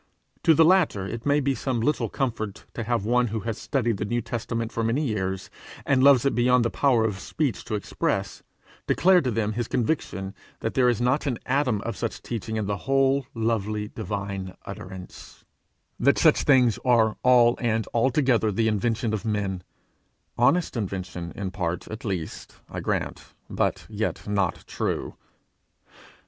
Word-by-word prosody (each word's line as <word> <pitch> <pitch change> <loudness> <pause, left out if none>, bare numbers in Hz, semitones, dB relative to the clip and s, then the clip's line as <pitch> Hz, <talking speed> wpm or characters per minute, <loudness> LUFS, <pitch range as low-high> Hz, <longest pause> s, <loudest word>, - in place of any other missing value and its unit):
To 165 -2 +5
the 160 - +6
latter 165 - +3
it 115 +6 -5
may 145 +1 +4
be 140 -1 +1
some 130 0 -2
little 150 +7 0
comfort 115 -7 -3
to 115 - -4
have 115 -3 0
one 125 +2 +3
who 110 0 -3
has 115 +1 -4
studied 120 -6 0
the 105 - -2
New 120 +3 -1
Testament 115 0 -3
for 115 - -2
many 120 +7 +1
years 95 -5 -2 0.3
and 130 -2 +3
loves 140 -2 +6
it 140 - +2
beyond 125 0 +3
the 115 - 0
power 125 -6 +3
of 105 -3 -2
speech 140 -5 -2
to 110 - -2
express, 105 - -2 0.5
declare 185 0 +5
to 130 - -1
them 110 -2 -1
his 120 +1 -2
conviction 110 - -2 0.3
that 110 - -2
there 125 -2 +4
is 120 - 0
not 130 +5 +1
an 125 -4 0
atom 125 -6 +1
of 115 - -4
such 115 - -4
teaching 110 -1 -4
in 110 -2 -1
the 100 0 -1
whole 135 -1 +3
lovely, 110 -2 -1
divine 100 -4 -5
utterance; 95 -2 -10 0.5
that 140 +3 +4
such 155 -2 +4
things 125 -5 +4
are 115 -4 +3
all 120 -1 +5
and 115 -2 +1
altogether 120 -2 +2
the 110 +3 +1
invention 110 +1 0
of 110 - -2
men 100 -4 -2 0.7
honest 160 +8 +2
invention, 90 -5 -4
in 95 -2 -4
part 85 -3 -3
at 110 +1 -7
least, 95 -7 -5 0.2
I - - -4
grant, - - -3 0.2
but - - -1
yet 110 0 -3
not 100 -3 0
true. - - -3
115 Hz, 170 wpm, -25 LUFS, 105-125 Hz, 0.7 s, the